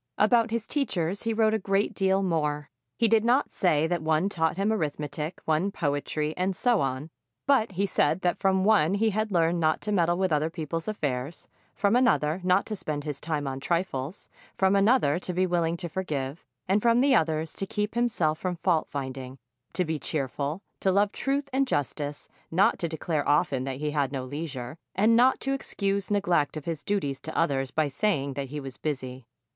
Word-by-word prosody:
About 230 +2 +4
his 225 -1 -2
teachers 200 - -1
he 225 -1 -1
wrote 220 -1 +3
a 220 - +1
great 195 +1 0
deal 195 0 +2
more. 150 -4 -1 0.3
He 230 - +3
did 220 0 +4
not 245 +4 +2
say 160 -5 +2
that 170 0 -1
one 160 +4 +1
taught 160 -3 0
him 200 +3 +1
arithmetic, 150 -2 -3
one 160 +5 +1
poetry, 150 -1 -1
and 185 +1 -1
so 240 -2 +2
on; 135 +4 -2 0.3
but 250 -7 +3
he 195 +3 +1
said 170 -2 +1
that 175 - 0
from 190 -1 +2
one 200 -4 +4
he 220 +2 +2
had 215 +1 -1
learned 170 -1 +2
not 155 -1 +2
to 210 - -3
meddle 175 -3 +2
with 190 -1 0
other 155 +1 +2
people's 165 0 -4
affairs, 145 -7 -3 0.3
from 200 +2 +2
another 185 -9 +2
not 185 +2 +3
to 215 - -4
spend 155 -6 -4
his 145 -2 -5
time 150 -3 -2
on 135 0 -3
trifles, 170 0 -2 0.3
from 190 +1 +3
another 195 - +3
to 180 - -4
be 185 +2 +2
willing 170 -2 0
to 175 - -4
forgive; 155 -5 -4 0.2
and 195 +3 +2
from 235 +1 +4
the 275 0 +4
others 160 - +1
to 195 - -4
keep 210 0 -2
himself 215 -10 +1
from 180 -1 -2
fault 170 -2 +1
finding, 130 -1 -5 0.4
to 180 - 0
be 160 -1 -2
cheerful, 145 +5 -3 0.2
to 190 - +2
love 200 +2 +3
truth 275 +3 -1
and 270 +1 +2
justice, 145 - -2 0.2
not 185 +5 +3
to 170 - -1
declare 155 -2 -2
often 140 -3 +2
that 135 -1 -4
he 150 +1 -2
had 145 -3 0
no 135 -2 -3
leisure, 140 -1 -6 0.2
and 220 +4 +4
not 255 +3 +5
to 270 - -1
excuse 200 -7 -2
neglect 175 -8 +1
of 150 - -7
his 165 -3 -4
duties 145 -10 -1
to 160 - -7
others 135 -5 +1
by 155 +2 +1
saying 140 -2 0
that 135 -1 -4
he 150 +2 -4
was 135 -3 -8
busy. 130 -4 -4
170 Hz, 200 wpm, -27 LUFS, 150-200 Hz, 0.4 s, not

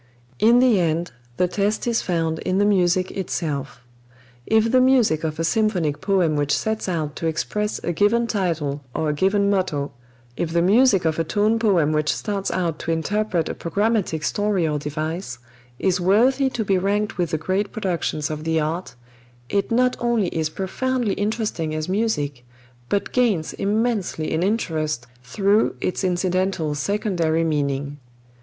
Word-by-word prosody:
In 235 +2 +5
the 245 -5 +4
end 170 0 0 0.3
the 180 - +2
test 205 +3 -1
is 235 -1 +1
found 165 -3 -1
in 185 0 -1
the 205 - +3
music 185 -2 +2
itself. 145 -9 -4 0.6
If 220 +1 +3
the 255 - +5
music 245 - +3
of 155 -1 -2
a - - 0
symphonic 180 -7 0
poem 185 -6 +2
which 145 -1 +1
sets 220 -3 -2
out 155 -5 -2
to 165 - -2
express 210 +6 -2
a - - -1
given 210 +7 +2
title 165 -10 -1
or 155 - 0
a - - +1
given 195 +6 +2
motto, 155 -8 -1 0.4
if 165 - -2
the 170 - +3
music 205 -1 +4
of 160 0 0
a - - +2
tone 210 +6 +1
poem 185 -9 +3
which 155 -1 +1
starts 200 -3 -2
out 170 -4 -1
to 165 - -3
interpret 180 +1 0
a - - -3
programmatic 200 -3 -1
story 205 -4 0
or 150 -1 -1
device, 155 -1 -4 0.4
is 185 +3 0
worthy 250 +9 +3
to 230 -4 -3
be 190 -1 +2
ranked 205 +1 -1
with 175 -2 +1
the 155 - -1
great 190 +6 -1
productions 170 -7 -2
of 155 0 -5
the 160 0 +1
art, 160 -2 -3 0.5
it 200 -1 0
not 250 +2 +2
only 235 -6 +1
is 160 -2 -1
profoundly 235 +6 -1
interesting 205 -7 -2
as 155 +1 -3
music, 150 - -1 0.5
but 200 - -1
gains 220 -11 +1
immensely 210 -6 -1
in 160 - 0
interest 160 - -1 0.2
through 200 - +1
its 180 - -2
incidental 185 -3 0
secondary 170 -1 0
meaning. 145 -2 -1
185 Hz, 165 wpm, -22 LUFS, 160-210 Hz, 0.6 s, In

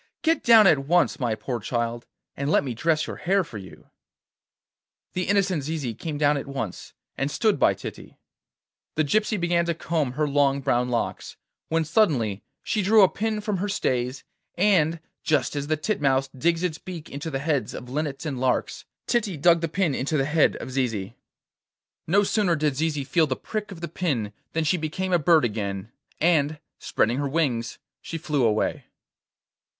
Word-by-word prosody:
Get 325 0 +2
down 225 -3 +8
at 145 -7 +4
once, 175 +1 +3
my 120 -4 0
poor 120 +2 -4
child, 120 +1 -3 0.3
and 140 +1 -2
let - - +3
me 130 -3 -3
dress 155 +6 +1
your - - -6
hair 195 +2 +1
for 115 -11 -8
you!' 95 -3 -14 1.2
The 180 0 -2
innocent 195 -5 +2
Zizi 140 -4 -3
came 150 +6 -5
down 145 0 +3
at 140 - -5
once, 135 -9 -5 0.3
and 135 - 0
stood 215 +1 +1
by - - +4
Titty. - - -9 0.8
The 155 - +2
gypsy 215 +7 +1
began 170 0 +1
to 170 - 0
comb 155 -6 -1
her 150 +2 0
long 140 -1 +2
brown 125 -2 +1
locks, 120 -1 -3 0.3
when 165 0 +1
suddenly 140 - +1 0.2
she 210 0 0
drew 210 +2 +6
a - - +8
pin 215 +2 -2
from 210 -2 -2
her 205 +3 -2
stays, 130 -9 -1 0.3
and, 170 -4 +3 0.2
just 150 -1 +1
as 145 0 -3
the 155 0 +1
titmouse 140 -6 +1
digs 165 +6 0
its 160 -3 -2
beak 170 -4 -8
into 145 +4 -6
the 135 - -2
heads 145 0 -1
of 125 - -8
linnets 145 +2 -3
and 140 -5 -3
larks, 125 -1 -1 0.2
Titty 210 -8 0
dug 170 +3 +4
the 165 - 0
pin 170 -2 0
into 140 +4 -1
the 135 - +1
head 150 +2 +3
of - - -7
Zizi. 115 -5 -2 0.9
No 200 +5 +4
sooner 195 -4 +2
did 150 -3 0
Zizi 150 -1 -1
feel 160 +3 +2
the 130 - -1
prick 215 - -5
of 175 -3 -9
the 170 - -3
pin 135 - -2 0.2
than 160 - 0
she 155 +4 +2
became 180 +4 -3
a 175 - +4
bird 160 -2 +4
again, 105 -1 -3 0.3
and, 155 -2 +2 0.2
spreading 120 +4 0
her 140 -1 -1
wings, 135 -7 -1 0.2
she 165 - -5
flew 150 -4 -1
away. 110 -2 0
150 Hz, 185 wpm, -25 LUFS, 130-175 Hz, 1.2 s, down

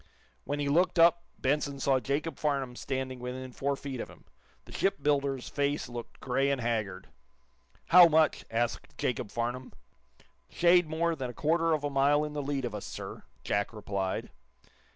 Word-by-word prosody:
When 145 - -2
he 145 - -1
looked 175 +6 +2
up 170 +1 +6 0.2
Benson 140 0 0
saw 135 -1 +2
Jacob 140 +3 -2
Farnum 140 -4 -1
standing 130 0 -4
within 125 +1 -6
four 140 +3 -1
feet 135 -2 -6
of - - -5
him. - - -16 0.4
The - - -14
shipbuilder's 140 -7 0
face 145 -1 -1
looked 120 -1 -8
gray 135 +2 +1
and 140 -1 0
haggard. 110 -6 -2 0.8
"How 175 0 +10
much?" 160 -1 +3
asked 115 +1 -2
Jacob 120 -3 -2
Farnum. 120 +3 -3 0.8
"Shade 175 -1 +4
more 165 +1 0
than 130 -4 -4
a 120 - -9
quarter 165 +1 +2
of 150 -2 -1
a 145 - -1
mile 140 +2 +3
in 150 0 -4
the 150 - -2
lead 140 -2 -2
of 120 - -4
us, 105 - -5
sir," - - -7 0.2
Jack 100 +2 -1
replied. 100 -3 -3
140 Hz, 170 wpm, -30 LUFS, 125-150 Hz, 0.8 s, How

